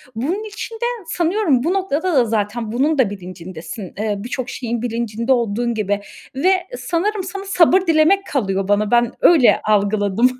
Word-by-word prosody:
Bunun 330 - -2
için 435 +2 -7
de 475 +1 -3 0.2
sanıyorum 335 - +1
bu 340 +5 +1
noktada 370 -2 -1
da 250 -3 +4
zaten 220 0 -2
bunun 285 +5 +1
da 240 -7 +3
bilincindesin. 180 -1 -8
Eee, 210 0 -1
birçok 245 +4 -5
şeyin 235 -2 -4
bilincinde 230 0 -2
olduğun 235 0 0
gibi 205 -2 -1 0.3
ve 370 +5 +1
sanırım 385 +2 -1
sana 390 +2 -6
sabır 370 -1 +4
dilemek 340 +3 +3
kalıyor 195 - -1
bana, 205 +1 +1
ben 240 0 +3
öyle 310 -9 +5
algıladım. 205 +2 +2
240 Hz, 155 wpm, -19 LUFS, 210-345 Hz, 0.3 s, öyle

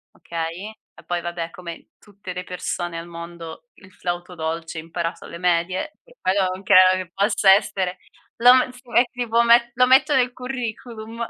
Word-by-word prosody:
okay, 170 +5 -5 0.2
e - - -17
poi 175 0 -1
vabbè 170 -1 -4
come 170 -1 -10
tutte 200 -3 -11
le 180 0 -5
persone 175 -1 -4
al 170 - -9
mondo, 170 +3 -9
il 200 -2 -18
flauto 175 0 -5
dolce 165 0 -4
imparato 165 +1 -5
alle 170 - -9
medie, 180 - 0
che - - -21
quello 190 +1 +2
non 190 +1 -9
credo 185 -1 +6
che 170 - -21
possa 200 -1 +4
essere 190 -2 0 0.4
lo 245 +2 +8
me 255 0 +2
si 250 - -16
met 240 +1 +3
tipo 235 -1 +1
met 235 0 +5
lo 250 0 +4
metto 270 +3 +5
nel 250 -1 +2
curriculum, 235 -2 -6
185 Hz, 175 wpm, -22 LUFS, 170-235 Hz, 0.4 s, lo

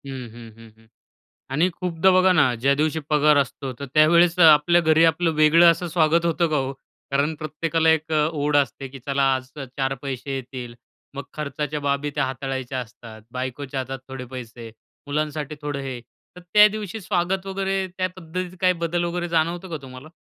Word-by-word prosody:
हं, 130 -3 -7
हं, 115 -1 -11
हं, 115 0 -14
हं 115 - -24 0.7
आणि 160 +6 +2
खूपदा 180 +1 +1
बघा 185 0 +5
ना, 140 -8 +3
ज्या 135 +4 +2
दिवशी 155 +2 0
पगार 150 0 +4
असतो 135 -1 -1
तर 140 - -6
त्यावेळेस 170 +3 +5
आपल्या 165 +1 +6
घरी 160 0 +4
आपलं 165 +1 +2
वेगळं 165 +3 +7
असं 170 +1 -2
स्वागत 165 0 +2
होतं 170 0 +1
का 155 - +1
हो? 135 -1 -1 0.4
कारण 140 +3 +1
प्रत्येकाला 160 +1 -1
एक 160 0 -2 0.2
ओढ 145 -1 0
असते, 135 -1 0
की 135 +1 -11
चला, 140 0 0
आज 130 0 -5
4 135 0 -3
पैसे 135 0 -4
येतील. 125 -2 -7 0.4
मग 140 - -5
खर्चाच्या 150 0 -4
बाबी 140 +1 -1
त्या 145 - +1
हाताळायच्या 130 -1 -4
असतात. 110 -2 -11
बायकोच्या 130 +1 -4
हातात 130 +1 -5
थोडे 130 -1 -7
पैसे, 120 -2 -9 0.4
मुलांसाठी 150 0 -3
थोडं 145 -1 -3
हे. 130 -3 -6 0.4
तर - - -10
त्या 210 +4 +6
दिवशी 215 0 -6
स्वागत 190 0 -1
वगैरे 195 0 -1
त्या 185 0 +1
पद्धतीत 180 +1 -6
काही 185 -1 +4
बदल 170 +1 -1
वगैरे 175 0 -3
जाणवतं 170 +2 -1
का 165 - -3
तुम्हाला? 130 +2 -11
150 Hz, 180 wpm, -23 LUFS, 135-170 Hz, 0.7 s, वेगळं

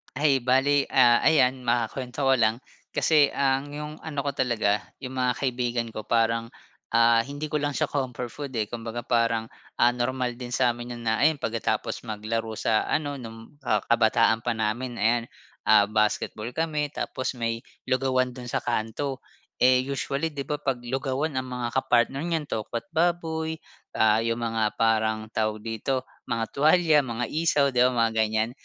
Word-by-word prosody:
Ay, 140 -1 +3
bale, 135 +3 +2
ah, 120 -2 +6
ayan 135 -4 +4
makuwento 125 +3 -1
ko 135 -2 +4
lang, 110 +2 +1 0.3
kasi 150 -3 +4
ang 135 0 +1
'yung 150 0 -5
ano 145 -3 -4
ko 140 - -1
talaga, 120 -6 +1 0.2
'yung 130 - -5
mga 125 -1 0
kaibigan 120 -2 -1
ko 110 -1 -7
parang, 115 0 +1 0.5
ah, 115 0 +5
hindi 145 +5 -4
ko 150 - +1
lang 145 -1 -2
siya - - +1
comfort 125 -3 -3
food, 140 -3 -7
eh, 110 - +1
kumbaga 115 +2 -6
parang, 115 -1 0 0.2
ah, 120 - +4
normal 125 0 -2
din 125 -1 -4
sa'min 120 -1 0
'yun 120 - -9
na 110 -1 +1
ayan 155 +2 +4
pagkatapos 115 -4 -2
maglaro 110 +1 -3
sa 110 0 +1
ano 145 -2 -1
nung, 115 +3 -11
ah, 105 -2 +2
kabataan 115 -1 +3
pa 120 0 -2
namin 115 +3 -2
ayan, 115 +2 +2 0.4
ah, 105 -1 +7
basketball 105 +1 -1
kami 155 -2 0
tapos 130 0 -3
may 115 -1 -2 0.2
lugawan 130 -1 +1
dun 125 -1 -9
sa - - -2
kanto. 120 +4 -2 0.4
Eh, 125 0 +5
usually 140 +3 -2
'di 140 -2 -6
ba 150 - -1
'pag 135 -4 -2
lugawan 135 +4 -2
ang 130 0 -3
mga 120 0 -3
kapartner 130 +2 +2
niyan 165 -3 -2
tokwa't 115 0 -4
baboy, 160 -1 0 0.3
ah, 110 0 +3
'yung 115 0 -1
mga 115 -2 -1
parang 110 -1 +1
tawag 110 -1 -1
dito, 115 +4 -3 0.2
mga 115 -1 -2
tuwalya, 155 0 +4
mga 120 -1 -3
isaw, 150 -1 +2
'di 125 -2 +3
ba 125 - +4
mga 115 -2 +2
ganiyan. 110 +1 0
125 Hz, 170 wpm, -26 LUFS, 115-140 Hz, 0.5 s, ah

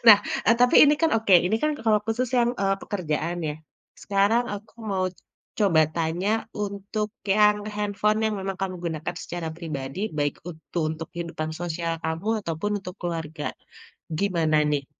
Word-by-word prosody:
Nah, 210 -2 +11 0.3
eee, 230 - +7
tapi 245 - +5
ini 295 - +5
kan 325 -1 +3
oke, 210 -4 +4
ini 220 - +2
kan 305 - +3
kalau 215 -1 +4
khusus 240 +3 0
yang, 240 0 +3
eee, 195 0 +3
pekerjaan, 170 -2 -2
ya. 150 - -2 0.5
Sekarang 205 +4 +3
aku 205 +1 -10 0.2
mau 185 -1 +1 0.5
coba 190 -7 +4
tanya, 175 +7 0
untuk 210 0 -3 0.2
yang 210 +1 +4
handphone 210 +1 +1
yang 215 -1 +1
memang 195 0 -3
kamu 190 -1 -2
gunakan 160 +1 -3
secara 170 -2 -4
pribadi, 145 -3 -5 0.2
baik 145 -1 0
untu 170 0 -6
untuk 160 +1 -5
kehidupan 170 -2 -4
sosial 170 -1 -2
kamu, 160 +6 -2 0.2
ataupun 165 +5 -2
untuk 180 -2 -8
keluarga. 165 -3 -3 0.7
Gimana, 165 -6 +2
nih 140 -2 -1
190 Hz, 155 wpm, -25 LUFS, 165-210 Hz, 0.7 s, Nah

